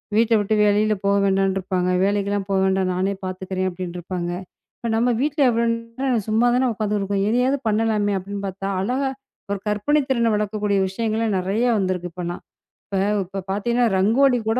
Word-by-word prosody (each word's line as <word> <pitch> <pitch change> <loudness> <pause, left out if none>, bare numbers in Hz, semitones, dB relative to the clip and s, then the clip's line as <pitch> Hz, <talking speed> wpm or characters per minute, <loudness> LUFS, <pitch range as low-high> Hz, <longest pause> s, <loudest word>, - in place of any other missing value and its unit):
வீட்ட 230 +1 +3
விட்டு 205 +1 0
வெளில 210 +1 +3
போக 200 0 +3
வேண்டாம்ன்னு 195 0 +2
இருப்பாங்க. 180 -1 -1
வேலைக்கு 200 0 +1
எல்லாம் 200 -1 -2
போக 195 - +2
வேண்டாம். 190 -1 +1
நானே 190 +2 0
பாத்துக்குறேன் 185 0 -3
அப்டின்னு 180 -1 -6
இருப்பாங்க. 175 0 -4 0.5
இப்ப 235 - -4
நம்ம 235 +2 +2
வீட்டுல 295 +1 +1
எவ்ளோ 235 0 +1
நேரம் 230 0 -2
சும்மா 225 +3 +3
தான் 255 +1 +2
உக்காந்திருக்கோம். 200 -2 -1
எதையாவது 250 +4 +2
பண்ணலாமே 215 -1 +1
அப்படின்னு 200 +2 -6
பாத்தா 195 +1 -5
அழகா 260 +7 0 0.4
ஒரு 200 - -1
கற்பனை 210 +9 +2
திறனை 235 -3 +2
வளர்க்கக்கூடிய 210 -1 0
விஷயங்கள் 220 +1 -1
நிறைய 195 +6 0
வந்திருக்கு. 185 -2 -1 1.1
இப்ப 195 +2 -6
பாத்தீங்கன்னா 235 +5 +1
ரங்கோலி 245 +7 +4
கூட 230 - +2
205 Hz, 155 wpm, -22 LUFS, 190-230 Hz, 1.1 s, ரங்கோலி